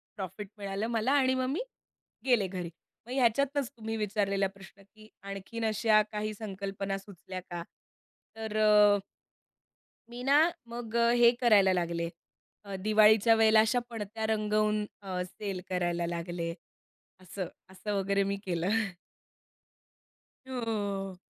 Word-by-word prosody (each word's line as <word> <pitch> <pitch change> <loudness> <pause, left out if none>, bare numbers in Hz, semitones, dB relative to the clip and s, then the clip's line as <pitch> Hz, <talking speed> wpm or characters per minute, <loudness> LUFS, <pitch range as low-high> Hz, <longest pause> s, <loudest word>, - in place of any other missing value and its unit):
Profit 195 +1 -6
मिळालं 200 +2 -3
मला 235 +3 +1
आणि 260 -2 +4
मग 255 0 0
मी 295 - -1 0.7
गेले 240 -7 +3
घरी. 180 -2 -5 0.4
मग 245 - -10
ह्याच्यातनच 270 +2 +2
तुम्ही 225 0 -4
विचारलेला 200 -2 0
प्रश्न, 195 0 -15
की 215 +2 -18 0.2
आणखीन 200 +4 -5
अशा 215 0 +4
काही 215 0 -3
संकल्पना 195 -2 -4
सुचल्या 190 -1 -9
का? 175 -1 -4 0.7
तर 220 -1 -4
अ 210 -1 +6 1.1
मी 240 +1 -8
ना 280 +2 +5 0.3
मग 235 -1 -7
अ, 235 0 +4
हे 240 -1 +6
करायला 205 -6 +5
लागले 170 -2 -1 0.6
अ, 200 -1 -7
दिवाळीच्या 215 +2 +5
वेळेला 220 -1 +6
अशा 225 +3 +2
पणत्या 220 -1 -4
रंगवून 215 -1 +1 0.2
अ, 185 -2 -3
सेल 195 0 -5
करायला 175 -2 0
लागले. 170 0 -3 0.7
असं, 185 +1 -5 0.2
असं 190 +2 -4
वगैरे 200 +1 +1
मी 200 0 -1
केलं. 175 0 -1 1.8
हो. 205 -6 -3
210 Hz, 125 wpm, -30 LUFS, 195-225 Hz, 1.8 s, अ